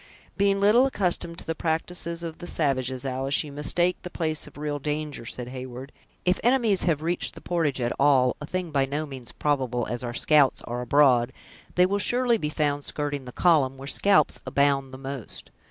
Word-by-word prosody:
"Being 200 0 +2
little 220 +6 +5
accustomed 180 -7 -1
to - - -9
the 165 - -1
practices 170 +1 -2
of 165 -1 -6
the 175 - -7
savages, 130 -5 -1
Alice, 135 +1 +1
you 150 - -9
mistake 175 +5 +1
the 180 - -7
place 155 -3 -2
of - - -14
real 145 -1 -3
danger," 150 -4 -4
said 125 -1 -5
Heyward. 130 +1 -8 0.3
"If 180 0 +2
enemies 235 -5 +3
have 155 -3 +1
reached 170 +2 -2
the - - -9
portage 160 -6 0
at 120 -1 0
all, 135 -3 +4
a 145 - -6
thing 180 -2 -3
by 135 -2 +1
no 150 +3 -2
means 130 -5 -8
probable, 130 -5 -1
as 120 +2 -4
our 120 -1 -4
scouts 150 -3 +3
are 120 +1 -4
abroad, 125 -2 +4 0.4
they 180 - +5
will 200 +2 0
surely 240 +2 +2
be 150 - -2
found 145 -1 -1
skirting 145 -2 -3
the 125 - -8
column, 140 -5 +3
where 135 +1 -9
scalps 155 0 +2
abound 140 -1 +1
the 130 - -8
most. 135 -3 -8
145 Hz, 195 wpm, -26 LUFS, 135-175 Hz, 0.4 s, little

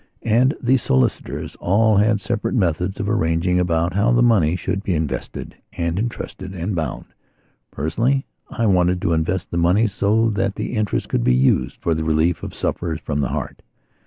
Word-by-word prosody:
And 120 +5 +3
the 130 +2 +3
solicitors 65 - -1
all 105 +3 +3
had 105 +1 +3
separate 115 +4 -2
methods 90 -2 0
of 100 - -2
arranging 90 -3 +1
about 85 -1 0
how 100 +5 +2
the 120 0 +4
money 95 -9 +3
should 95 +1 -2
be 95 -4 -1
invested 80 -2 -4 0.2
and 85 +1 -2
entrusted 95 -4 -5
and 90 +4 -3
bound. 80 -6 -3 0.6
Personally, 120 - 0 0.2
I 115 - -1
wanted 90 -3 +3
to 85 - +2
invest 85 +3 -1
the 85 - -2
money 90 +6 +3
so 110 +2 +1
that 100 -1 -1
the - - -4
interest 105 -3 -1
could - - 0
be 60 +1 +3
used 65 +1 +2
for 85 - +1
the 80 0 -2
relief 80 +1 +1
of - - -7
sufferers 80 -2 -2
from 75 -1 -3
the 70 - 0
heart. - - -5
95 Hz, 180 wpm, -21 LUFS, 80-110 Hz, 0.6 s, the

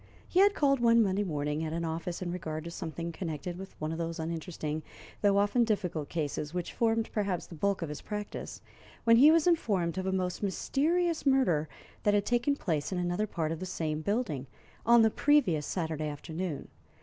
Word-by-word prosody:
He 360 - +1
had 405 +1 +6
called 275 -2 +3
one 235 -1 +5
Monday 195 0 +1
morning 150 -3 -2
at 160 0 -3
an 170 0 -2
office 165 +2 -3
in 175 - -3
regard 160 -3 -4
to 170 - -6
something 170 0 -5
connected 165 0 -4
with 190 +2 -10
one 155 +1 -2
of 165 - -4
those 165 0 -3
uninteresting, 160 -1 -4 0.4
though 200 -1 +4
often 205 +4 +3
difficult, 180 -9 -1
cases 150 0 -3
which 175 -1 -3
formed, 225 -1 +1
perhaps, 200 -5 -1
the - - -12
bulk 195 +3 0
of 165 - -4
his 150 - -6
practice, 210 -1 -6 0.4
when 230 -1 +6
he 280 +5 +8
was 325 -1 +5
informed 195 - +1
of 185 - -3
a - - +1
most 185 -1 -1
mysterious 320 - 0
murder 220 - +3 0.3
that 205 0 +3
had 205 0 +2
taken 245 +4 +2
place 160 - -2
in 185 - -1
another 180 +4 0
part 160 -5 -2
of 165 - -3
the 185 - -4
same 155 -4 -2
building 200 - -1 0.4
on 235 -1 +7
the 220 - +4
previous 200 - +3
Saturday 160 -3 -2
afternoon. 160 +1 -5
180 Hz, 195 wpm, -30 LUFS, 160-225 Hz, 0.4 s, he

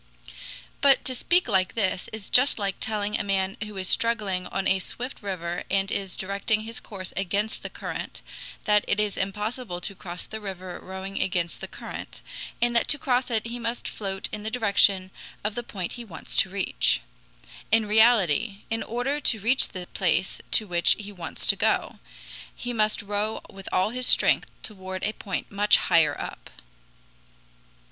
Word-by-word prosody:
But 275 -1 +5
to 260 - -1
speak 345 +7 +2
like 190 -4 +2
this 190 -4 0
is 215 -3 -7
just 255 +3 +5
like 200 -2 -1
telling 210 -1 -1
a - - 0
man 195 0 0
who 210 -1 -8
is 185 -1 -2
struggling 205 -6 +1
on 195 - -1
a 190 - +3
swift 250 +7 -5
river 175 -4 -3
and 195 0 +1
is 195 -2 -2
directing 200 +3 0
his 230 +2 -6
course 190 -4 -8
against 200 +3 -1
the - - -5
current, - - -6 0.4
that 210 -1 +4
it - - +1
is 210 -1 +1
impossible 210 0 -3
to 200 - -4
cross 180 -2 -6
the 220 0 -7
river 185 -3 -6
rowing 190 +1 -5
against 175 -2 -1
the - - -4
current, - - -8 0.4
and 240 0 +2
that 235 - +3
to 295 - +4
cross 255 -3 +1
it 225 -2 0
he 235 +1 -5
must 230 +1 -3
float 195 -2 -3
in 215 - -5
the 215 - -3
direction 200 -5 +3 0.3
of 210 +1 0
the 240 - -2
point 190 -6 -5
he 240 - -6
wants 175 -8 -7
to 190 - +5
reach. 120 - +1 0.7
In 220 0 +5
reality, 210 -3 +4
in 225 0 0
order 250 +5 -1
to 235 -6 +1
reach 235 +6 +3
the 180 -1 -7
place 185 +1 +1
to 215 - +2
which 175 -3 +3
he 205 -1 -8
wants 175 -5 -6
to - - +6
go, - - +1 0.6
he 245 0 -4
must 215 -2 +1
row 205 +2 -1
with 195 -1 -9
all 185 +4 +2
his 250 +1 0
strength - - +5
toward 190 -3 -5
a 215 - 0
point 195 -4 -4
much 205 +1 +5
higher 165 -2 +3
up. - - -7
205 Hz, 180 wpm, -26 LUFS, 190-225 Hz, 0.7 s, to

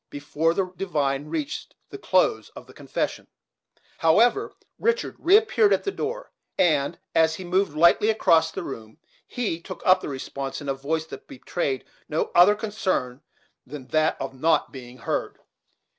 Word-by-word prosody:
Before 145 +3 -1
the 195 - +1
divine 145 -7 -1
reached 155 -2 -5 0.2
the - - -8
close - - +1
of - - -10
the - - -16
confession, - - -4 0.7
however, 225 - +3 0.3
Richard 465 +1 0
reappeared 345 - +4
at 190 - 0
the 395 - -2
door, - - -5 0.3
and, 155 -2 +2 0.2
as 160 0 +3
he 185 - -8
moved 180 -3 0
lightly 170 +6 +5
across 165 -7 +3
the - - -6
room, 110 -2 -8 0.3
he 210 -10 -3
took 185 +1 -9
up 185 0 +5
the - - -5
response, 135 0 -5
in 145 - -9
a 135 - +1
voice 155 +4 -2
that - - -11
betrayed 135 0 -3 0.2
no 155 - -1
other 180 +4 +6
concern 190 - -2 0.4
than 145 -3 -9
that 155 0 +1
of 135 - -5
not 155 +5 +1
being 125 -2 -11
heard. 115 - -3
160 Hz, 160 wpm, -24 LUFS, 140-195 Hz, 0.7 s, other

